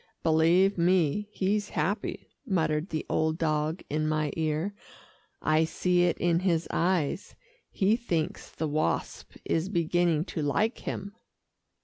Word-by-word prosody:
"Believe 170 +4 +4
me, 180 +3 +2
he's 205 +2 0
happy," 205 +4 -2 0.2
muttered 160 -2 0
the 155 - -3
old 160 0 0
dog 155 +1 -1
in 155 +1 -1
my 155 -1 0
ear. 160 +4 -1 0.7
"I 155 +1 +3
see 175 +2 +2
it 175 - +1
in 170 -1 +2
his 170 -3 +1
eyes. 175 -1 0 0.3
He 205 +3 +2
thinks 175 -10 -2
the 160 - -3
Wasp 150 - -2
is 165 +3 0
beginning 170 -3 +1
to 160 - -4
like 205 - 0
him." 200 +1 -5
170 Hz, 130 wpm, -28 LUFS, 155-190 Hz, 0.7 s, Believe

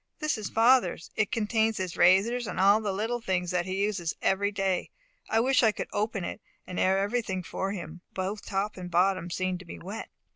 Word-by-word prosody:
"This 305 -2 0
is 215 -3 -5
father's, 225 -7 +3
it 215 -2 +1
contains 220 -1 +1
his 185 -2 -3
razors, 205 +7 +4
and - - -4
all 200 +3 +5
the 210 -2 -1
little 225 +5 -2
things 180 -4 -1
that 180 0 0
he 190 +1 -1
uses 190 -6 -1
every 200 +1 +1
day. 195 -3 -1 0.4
I 225 - +3
wish 255 +3 +3
I 225 -3 +5
could - - -5
open 210 -2 -1
it, - - -5 0.2
and 180 - -5
air 190 +1 +3
everything 200 -2 -1
for 190 +3 -3
him; 175 -3 -7
both 195 +3 -3
top 200 +1 -2
and 180 -1 -6
bottom 180 0 +2
seem 185 0 -2
to 185 - -12
be 170 - -8
wet." 200 +5 -7
195 Hz, 210 wpm, -28 LUFS, 185-220 Hz, 0.4 s, all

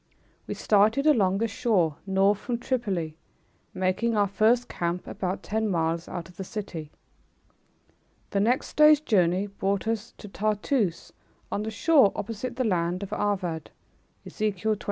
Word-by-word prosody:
We - - -4
started 220 +7 +3
along 200 -11 +4
the 230 +3 0
shore 200 - +1
north 195 +1 +3
from 240 +1 -3
Tripoli, 200 - -2 0.5
making 195 +4 0
our 205 -1 +3
first 220 +5 +2
camp 175 +1 -3
about 185 0 -4
ten 220 0 -1
miles 165 -2 -1
out 175 - -6
of 180 - -18
the 195 - -4
city. 180 -6 -6 1.4
The 200 - +1
next 235 +6 0
day's 300 -1 +7
journey 190 - +2
brought 200 0 -2
us 225 0 -3
to 210 - -10
Tartoose 210 -1 -1 0.4
on 205 - -1
the 215 - -3
shore 265 0 +4
opposite 230 +3 -4
the 255 - 0
island 180 -1 0
of 195 - -6
Arvad. 185 -6 -2 0.6
Ezek. 210 -2 -3
205 Hz, 145 wpm, -26 LUFS, 185-225 Hz, 1.4 s, day's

